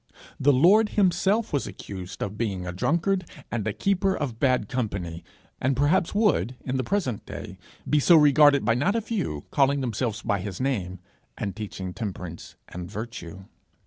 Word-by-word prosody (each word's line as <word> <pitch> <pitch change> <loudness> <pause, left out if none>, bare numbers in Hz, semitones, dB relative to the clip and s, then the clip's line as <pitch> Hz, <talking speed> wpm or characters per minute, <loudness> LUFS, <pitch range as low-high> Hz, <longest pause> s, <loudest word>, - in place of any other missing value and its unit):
The 145 - +5
Lord 195 +11 +5
himself 200 +2 +2
was 140 - 0
accused 95 -2 -7
of 100 0 -4
being 100 -5 -2
a 90 - -3
drunkard 170 - 0 0.3
and 110 -3 -2
a - - +1
keeper 195 - +1
of 125 -7 -4
bad 130 -2 +2
company 100 -10 -3 0.4
and 130 0 +1
perhaps 165 +7 +2
would 155 - +2
in 130 0 -1
the 130 - 0
present 135 - -1
day - - -8 0.3
be 150 - +3
so 170 +4 +6
regarded 145 -3 +6
by 115 - +4
not 145 - +1
a 230 - +1
few 185 - -3
calling 140 0 +3
themselves 115 -2 -2
by 100 - 0
his 95 0 -6
name, 100 -9 -1 0.4
and 100 -3 -3
teaching 95 -4 -6
temperance 90 -6 -6
and 90 0 -7
virtue. 100 -4 -7
125 Hz, 170 wpm, -26 LUFS, 100-155 Hz, 0.4 s, so